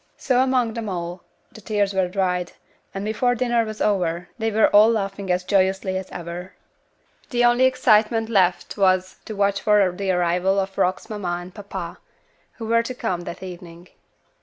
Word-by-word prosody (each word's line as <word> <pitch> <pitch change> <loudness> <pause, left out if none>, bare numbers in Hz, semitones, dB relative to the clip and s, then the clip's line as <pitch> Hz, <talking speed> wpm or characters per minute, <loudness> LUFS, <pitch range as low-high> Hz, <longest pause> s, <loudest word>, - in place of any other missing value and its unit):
So 255 -2 +1
among 255 -3 +1
them 225 -2 -4
all, 175 -1 -5 0.3
the 220 - -13
tears 205 -1 0
were 190 -1 +1
dried; 180 -1 -1 0.4
and 195 +1 -5
before 245 +3 +1
dinner 240 -1 +1
was 215 -1 -7
over, 180 -4 0
they 225 0 0
were 220 0 +4
all 210 +2 +6
laughing 195 -3 -2
as 180 0 0
joyously 190 0 +1
as 190 0 -4
ever. 175 +2 -7 0.8
The 245 -1 +2
only 240 +2 +4
excitement 225 -3 +3
left 185 -3 +1
was 185 -1 +2
to 215 - -6
watch 200 0 +1
for 205 -3 +4
the 190 +2 -4
arrival 180 +2 +1
of 195 0 -3
Rock's 185 -1 0
papa - - -7
and 175 -3 -4
mamma, 205 -2 -7 0.6
who 225 - -8
were 230 +1 +3
to 250 +2 -6
come 225 -9 -2
that 170 - -7
evening. 175 -1 -10
195 Hz, 175 wpm, -22 LUFS, 180-220 Hz, 0.8 s, all